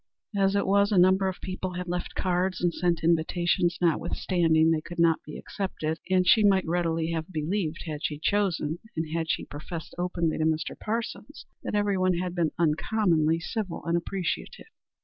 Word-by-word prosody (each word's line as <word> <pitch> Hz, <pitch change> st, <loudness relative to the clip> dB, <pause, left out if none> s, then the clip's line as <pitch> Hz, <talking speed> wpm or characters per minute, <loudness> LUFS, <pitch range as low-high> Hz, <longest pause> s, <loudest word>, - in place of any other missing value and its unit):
As 195 Hz, 0 st, +2 dB
it 200 Hz, -, +2 dB
was 200 Hz, +2 st, +3 dB
a 200 Hz, -, +3 dB
number 190 Hz, +2 st, +5 dB
of 190 Hz, -, -3 dB
people 185 Hz, 0 st, -4 dB
had 180 Hz, 0 st, -4 dB
left 175 Hz, 0 st, -3 dB
cards 185 Hz, 0 st, 0 dB
and 175 Hz, -1 st, +1 dB
sent 170 Hz, -2 st, 0 dB
invitations 170 Hz, +2 st, +2 dB
notwithstanding 165 Hz, -1 st, +2 dB
they 160 Hz, -1 st, +1 dB
could 175 Hz, +2 st, -9 dB
not 165 Hz, -1 st, +4 dB
be 150 Hz, -, -8 dB
accepted, 160 Hz, -5 st, -4 dB
and 185 Hz, -1 st, +3 dB
she 215 Hz, +3 st, +6 dB
might 195 Hz, -2 st, +4 dB
readily 165 Hz, -1 st, 0 dB
have 165 Hz, +2 st, -3 dB
believed, 165 Hz, +1 st, -2 dB
had 155 Hz, -2 st, -5 dB
she 150 Hz, -, -1 dB
chosen 170 Hz, -3 st, 0 dB, 0.2 s
and 160 Hz, -, 0 dB
as 165 Hz, -1 st, -1 dB
she -, -, -1 dB
professed 160 Hz, +3 st, -7 dB
openly 175 Hz, -3 st, -1 dB
to 155 Hz, -, +2 dB
Mr. 160 Hz, 0 st, 0 dB
Parsons 225 Hz, +2 st, -5 dB, 0.2 s
that -, -, -3 dB
everyone 190 Hz, -3 st, +2 dB
had 180 Hz, 0 st, -2 dB
been 170 Hz, -3 st, +1 dB
uncommonly 165 Hz, 0 st, +2 dB
civil 190 Hz, 0 st, -4 dB
and 170 Hz, 0 st, +1 dB
appreciative. 175 Hz, +1 st, -3 dB
175 Hz, 175 wpm, -27 LUFS, 160-190 Hz, 0.2 s, she